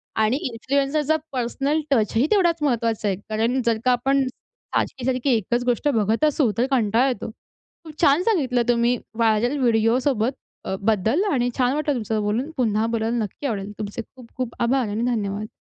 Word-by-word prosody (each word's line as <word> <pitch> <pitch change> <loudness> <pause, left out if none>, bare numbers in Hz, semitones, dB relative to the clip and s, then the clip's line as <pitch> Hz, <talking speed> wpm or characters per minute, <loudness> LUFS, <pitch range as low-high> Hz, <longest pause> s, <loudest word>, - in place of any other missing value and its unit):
आणि 220 +4 +2
इन्फ्लुएन्सरचा 280 +5 0 0.2
पर्सनल 275 +4 -1
टचही 225 0 +2
तेवढाचं 345 -7 +2
महत्वाचा 230 -5 0
आहे. 195 - +1
कारण 230 +4 0
जर 230 -1 +2
का 255 - +5
आपण 270 +2 +2 0.5
सारखी 255 -2 -1
सारखी 255 +1 0
एकचं 235 +3 -1
गोष्ट 245 +3 0
बघत 225 0 +1
असू 290 -6 +2
तर 240 - +3
कंटाळा 235 0 +3
येतो. 245 -4 -3 0.5
खूप 310 -2 -10
छान 305 +1 +4
सांगितलं 275 - +1
तुम्ही 240 +1 +3 0.2
व्हायरल 230 +4 +2
व्हिडिओ 230 -1 +3
सोबत 235 -2 0 0.3
अ, 190 - -2
बद्दल 220 - +1
आणि 245 -4 +1
छान 255 -1 +2
वाटलं 300 0 0
तुमचं 220 -2 -2
बोलून 220 +8 -1
पुन्हा 220 -3 +1
बोलायला 230 +1 0
नक्की 220 +5 -4
आवडेल. 205 -4 -3
तुमचे 210 +2 -4
खूप 250 -3 -13
खूप 255 -2 -3
आभार 250 0 +2
आणि 210 +3 -2
धन्यवाद. 210 -3 -2
240 Hz, 170 wpm, -23 LUFS, 220-270 Hz, 0.5 s, का